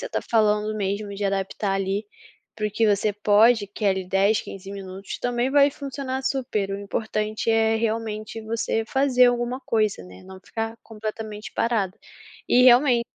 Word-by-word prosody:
você -, -, -4 dB
está -, -, -2 dB
falando 215 Hz, -1 st, +2 dB
mesmo, 200 Hz, 0 st, -2 dB
de 205 Hz, -, -4 dB
adaptar 195 Hz, 0 st, -1 dB
ali, 195 Hz, +2 st, -1 dB, 0.5 s
para 215 Hz, -, -2 dB
o -, -, -3 dB
que 225 Hz, +2 st, +1 dB
você 205 Hz, 0 st, +1 dB
pode, 210 Hz, +1 st, +4 dB
que 200 Hz, -, -12 dB
é -, -, +6 dB
ali, 190 Hz, -1 st, -1 dB
10, 195 Hz, +3 st, +2 dB
15 195 Hz, 0 st, -9 dB
minutos, 195 Hz, 0 st, -7 dB
também 245 Hz, +1 st, -1 dB
vai 285 Hz, 0 st, +5 dB
funcionar 275 Hz, -2 st, -5 dB
super, 255 Hz, -7 st, -1 dB
o 195 Hz, -, -3 dB
importante 215 Hz, +1 st, -3 dB
é, 225 Hz, 0 st, +3 dB
realmente, 220 Hz, -1 st, -3 dB
você 225 Hz, 0 st, -1 dB
fazer 255 Hz, +1 st, +3 dB
alguma 245 Hz, +1 st, 0 dB
coisa, 215 Hz, -, 0 dB
né, 90 Hz, 0 st, -13 dB
não 190 Hz, 0 st, -11 dB
ficar 225 Hz, +3 st, -5 dB
completamente 215 Hz, -1 st, -6 dB
parada. 220 Hz, -5 st, 0 dB, 0.5 s
E 250 Hz, -, +5 dB
realmen 250 Hz, -1 st, +6 dB
215 Hz, 170 wpm, -24 LUFS, 200-235 Hz, 0.5 s, é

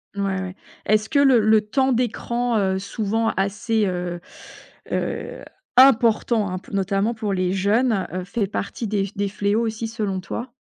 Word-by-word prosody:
Ouais, 195 Hz, -1 st, -1 dB
ouais. 185 Hz, -1 st, -6 dB, 0.3 s
Est-ce 215 Hz, 0 st, +2 dB
que 285 Hz, -, +2 dB
le 270 Hz, -4 st, +6 dB
le 215 Hz, 0 st, +4 dB
temps 260 Hz, +5 st, +1 dB
d'écran, 240 Hz, 0 st, -1 dB
heu, 190 Hz, -1 st, +1 dB
souvent 220 Hz, +2 st, -1 dB
assez, 210 Hz, +3 st, 0 dB
heu 180 Hz, -1 st, -3 dB, 0.7 s
heu, -, -, -3 dB, 0.3 s
important 230 Hz, -5 st, +4 dB
hein, 185 Hz, -, -3 dB
notamment 195 Hz, +3 st, 0 dB
pour 215 Hz, -2 st, -3 dB
les 185 Hz, -1 st, 0 dB
jeunes, 205 Hz, +2 st, +1 dB
heu, 185 Hz, 0 st, -3 dB
fait 200 Hz, +1 st, -2 dB
partie 210 Hz, +3 st, -4 dB
des 200 Hz, -1 st, 0 dB
f 195 Hz, -, -15 dB
des 200 Hz, 0 st, 0 dB
fléaux 205 Hz, +3 st, 0 dB
aussi 225 Hz, 0 st, -3 dB
selon 210 Hz, -4 st, -3 dB
toi? 240 Hz, +6 st, -6 dB
210 Hz, 165 wpm, -22 LUFS, 195-230 Hz, 0.7 s, le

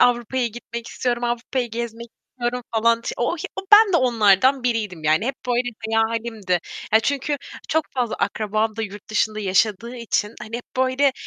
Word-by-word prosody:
Avrupa'ya 245 Hz, +1 st, +2 dB
gitmek 235 Hz, 0 st, -7 dB
istiyorum, 240 Hz, -1 st, -2 dB
Avrupa'yı 240 Hz, +1 st, -2 dB
gezmek 235 Hz, 0 st, -5 dB, 0.2 s
istiyorum." 245 Hz, 0 st, -3 dB
falan 230 Hz, +1 st, +3 dB
t -, -, -6 dB
o 240 Hz, +8 st, 0 dB
i -, -, -9 dB, 0.2 s
o -, -, -1 dB
ben 415 Hz, -2 st, +9 dB
de -, -, +5 dB
onlardan 245 Hz, -, +4 dB
biriydim, 210 Hz, -9 st, -1 dB
yani, 155 Hz, +8 st, +3 dB
hep 270 Hz, -, -1 dB
böyle 245 Hz, 0 st, +1 dB, 0.3 s
hayalimdi. 225 Hz, -4 st, 0 dB, 0.3 s
Ya, 220 Hz, -, +7 dB
çünkü 285 Hz, +4 st, -1 dB, 0.3 s
çok 320 Hz, 0 st, +2 dB
fazla 245 Hz, -4 st, 0 dB
akrabam 215 Hz, +1 st, -1 dB
da 225 Hz, -, -2 dB
yurt 205 Hz, 0 st, -8 dB
dışında 215 Hz, 0 st, 0 dB
yaşadığı 210 Hz, +4 st, +1 dB
için, 225 Hz, -2 st, -1 dB
hani, 225 Hz, +2 st, -5 dB
hep 240 Hz, -, -8 dB
böyle 260 Hz, +2 st, +3 dB
235 Hz, 170 wpm, -22 LUFS, 215-250 Hz, 0.3 s, ben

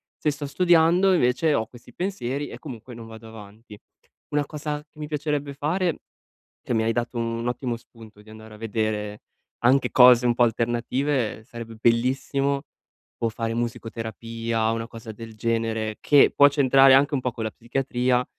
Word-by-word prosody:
Se 150 Hz, -, 0 dB
sto 145 Hz, 0 st, -6 dB
studiando 175 Hz, +4 st, +4 dB
invece 150 Hz, +1 st, +2 dB
ho 110 Hz, -, +1 dB
questi 120 Hz, 0 st, -16 dB
pensieri 145 Hz, -7 st, -3 dB
e -, -, -9 dB
comunque 125 Hz, -4 st, -9 dB
non 115 Hz, -1 st, -10 dB
vado 110 Hz, 0 st, -11 dB
avanti. 110 Hz, 0 st, -13 dB, 0.5 s
Una 145 Hz, 0 st, 0 dB
cosa 150 Hz, 0 st, -5 dB
mi 150 Hz, -1 st, -7 dB
piacerebbe 150 Hz, -1 st, -2 dB
fare, 165 Hz, +5 st, -1 dB, 0.6 s
che -, -, -3 dB
mi 110 Hz, 0 st, +1 dB
hai 115 Hz, -, +1 dB
dato 120 Hz, +1 st, -3 dB
un 115 Hz, 0 st, -2 dB
ottimo 125 Hz, -1 st, -2 dB
spunto 110 Hz, -3 st, -16 dB
di 110 Hz, -, -18 dB
andare 110 Hz, 0 st, -12 dB
a -, -, -13 dB
vedere 105 Hz, -1 st, -3 dB, 0.4 s
anche 130 Hz, +3 st, +3 dB
cose 125 Hz, -1 st, +7 dB
un 120 Hz, -, +3 dB
po' 125 Hz, -, +4 dB
alternative, 120 Hz, +1 st, -1 dB
sarebbe 115 Hz, -1 st, -9 dB
bellissimo 135 Hz, +4 st, +1 dB, 0.6 s
o 115 Hz, -, +2 dB
fare 115 Hz, 0 st, -3 dB
musicoterapia 115 Hz, -1 st, -3 dB
o -, -, -1 dB
una 115 Hz, 0 st, -4 dB
cosa 115 Hz, -1 st, -9 dB
del 115 Hz, +1 st, -10 dB
genere, 115 Hz, -1 st, -1 dB
che 145 Hz, -2 st, +6 dB
può 145 Hz, 0 st, +7 dB
c'entrare 135 Hz, -1 st, +5 dB
anche 140 Hz, +3 st, +4 dB
un 130 Hz, -, -1 dB
po' 125 Hz, -, -1 dB
con 115 Hz, -1 st, -5 dB
la 110 Hz, -, -3 dB
psichiatria, 125 Hz, +1 st, -1 dB
120 Hz, 170 wpm, -24 LUFS, 115-140 Hz, 0.6 s, cose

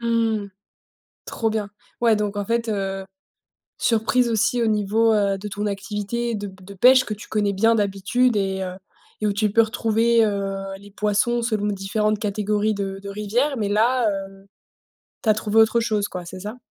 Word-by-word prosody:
Mmh 235 Hz, -, -4 dB, 0.4 s
mh. 200 Hz, -, -10 dB, 0.8 s
Trop 225 Hz, -, -1 dB
bien. 215 Hz, -2 st, -2 dB, 0.3 s
Ouais, 230 Hz, -2 st, +4 dB
donc 205 Hz, -1 st, -2 dB
en 205 Hz, -, -2 dB
fait, 230 Hz, +1 st, -1 dB
heu, 195 Hz, -2 st, -2 dB, 0.8 s
surprise 235 Hz, +2 st, +2 dB
aussi 230 Hz, +2 st, +1 dB
au 230 Hz, -, +2 dB
niveau, 215 Hz, +2 st, +2 dB
heu, 200 Hz, -2 st, +2 dB
de 210 Hz, -, -6 dB
ton 205 Hz, +1 st, -4 dB
activité 210 Hz, +3 st, -3 dB
de 205 Hz, -1 st, -4 dB
p 190 Hz, -1 st, -13 dB
de 200 Hz, +2 st, -10 dB
pêche 255 Hz, +6 st, +6 dB
que 215 Hz, -, -3 dB
tu 210 Hz, -, -12 dB
connais 205 Hz, -2 st, 0 dB
bien 225 Hz, +4 st, +3 dB
d'habitude 210 Hz, +4 st, +1 dB
et 195 Hz, -1 st, -1 dB
heu 185 Hz, -1 st, -5 dB, 0.5 s
et -, -, 0 dB
où 205 Hz, -, +1 dB
tu 210 Hz, +1 st, +1 dB
peux 230 Hz, +2 st, +5 dB
retrouver, 225 Hz, +1 st, +2 dB
heu, 200 Hz, -2 st, -2 dB, 0.2 s
les 205 Hz, 0 st, -15 dB
poissons 210 Hz, +4 st, +1 dB
selon 215 Hz, -3 st, -1 dB
différentes 210 Hz, +2 st, -1 dB
catégories 210 Hz, +1 st, 0 dB
de 195 Hz, -1 st, -4 dB
de 200 Hz, -, -7 dB
rivières, 225 Hz, +8 st, -1 dB
mais 210 Hz, -3 st, -1 dB
là, 230 Hz, +3 st, +2 dB, 0.2 s
heu, 195 Hz, 0 st, -17 dB, 0.8 s
tu 220 Hz, -, +1 dB
as -, -, +7 dB
trouvé 210 Hz, 0 st, -2 dB
autre 225 Hz, +1 st, +5 dB
chose, 215 Hz, -3 st, 0 dB
quoi, 180 Hz, -3 st, -7 dB
c'est 185 Hz, +2 st, -8 dB
ça? 210 Hz, +5 st, -7 dB
210 Hz, 190 wpm, -23 LUFS, 200-225 Hz, 0.8 s, as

